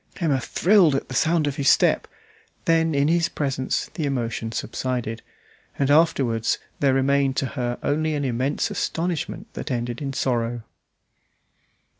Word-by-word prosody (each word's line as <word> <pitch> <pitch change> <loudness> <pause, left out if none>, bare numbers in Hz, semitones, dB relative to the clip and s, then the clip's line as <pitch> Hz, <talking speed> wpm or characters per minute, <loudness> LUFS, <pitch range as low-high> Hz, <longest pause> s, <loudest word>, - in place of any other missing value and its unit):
Emma 150 -7 +1
thrilled 180 - +4
at 135 - -3
the - - -6
sound 160 +3 +2
of 145 -1 -2
his 140 -1 +3
step; - - +3 0.6
then 165 -1 +2
in 140 +1 +3
his 170 +1 +2
presence 135 -3 -2
the 165 - -3
emotion 115 -5 -2
subsided, 115 0 -3 0.6
and 140 0 +1
afterwards 135 -8 +2 0.2
there 135 -2 +3
remained 135 0 +2
to - - +1
her 125 -2 -3
only 155 +1 0
an 145 -1 -1
immense 130 +3 -1
astonishment 170 +2 -2
that - - -6
ended 120 -1 -3
in 140 -1 -3
sorrow. 120 -3 -1
140 Hz, 145 wpm, -23 LUFS, 125-155 Hz, 0.6 s, thrilled